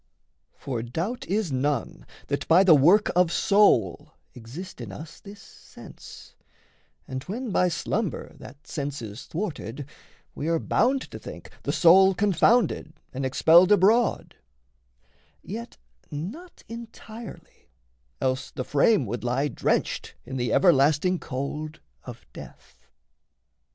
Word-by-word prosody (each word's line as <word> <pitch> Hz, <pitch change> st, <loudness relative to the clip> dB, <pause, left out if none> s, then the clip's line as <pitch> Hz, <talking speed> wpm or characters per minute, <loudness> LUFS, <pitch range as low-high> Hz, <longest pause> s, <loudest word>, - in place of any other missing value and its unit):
For 125 Hz, -4 st, -4 dB
doubt 165 Hz, -, -4 dB
is 200 Hz, -4 st, -1 dB
none 130 Hz, -, -2 dB, 0.2 s
that -, -, -3 dB
by 180 Hz, +4 st, +6 dB
the 185 Hz, -4 st, +7 dB
work 175 Hz, +9 st, +5 dB
of 180 Hz, -2 st, +3 dB
soul 185 Hz, -, +2 dB, 0.2 s
Exist 130 Hz, +8 st, -10 dB
in 110 Hz, -5 st, -7 dB
us 155 Hz, +10 st, -10 dB
this 200 Hz, 0 st, -12 dB
sense, -, -, -14 dB, 0.7 s
and 130 Hz, 0 st, -5 dB
when 235 Hz, +4 st, -5 dB
by 180 Hz, -, +3 dB
slumber 180 Hz, +3 st, -3 dB
That 145 Hz, -, -13 dB
sense 140 Hz, -4 st, -5 dB
is 105 Hz, +1 st, -9 dB
thwarted, 150 Hz, -, -5 dB, 0.5 s
we 150 Hz, -, -5 dB
are 165 Hz, 0 st, +2 dB
bound 260 Hz, +10 st, +1 dB
to -, -, -8 dB
think -, -, -10 dB
The -, -, -2 dB
soul 190 Hz, +3 st, +6 dB
confounded 200 Hz, -3 st, +2 dB, 0.2 s
and 135 Hz, +1 st, -4 dB
expelled 170 Hz, +8 st, +5 dB
abroad 210 Hz, +4 st, +3 dB, 1.1 s
Yet 115 Hz, -, -8 dB, 0.3 s
not 220 Hz, -, -8 dB
entirely, 230 Hz, -, -11 dB, 0.5 s
else 130 Hz, 0 st, -1 dB
the 130 Hz, -, -5 dB
frame 145 Hz, -, +2 dB
would 115 Hz, +1 st, -5 dB
lie 130 Hz, +4 st, 0 dB
Drenched -, -, -2 dB
in 130 Hz, +2 st, -7 dB
the 120 Hz, -2 st, -1 dB
everlasting 160 Hz, +2 st, +3 dB
cold 150 Hz, +4 st, -5 dB, 0.3 s
of 120 Hz, -2 st, -10 dB
death. -, -, -14 dB
160 Hz, 125 wpm, -25 LUFS, 130-200 Hz, 1.1 s, the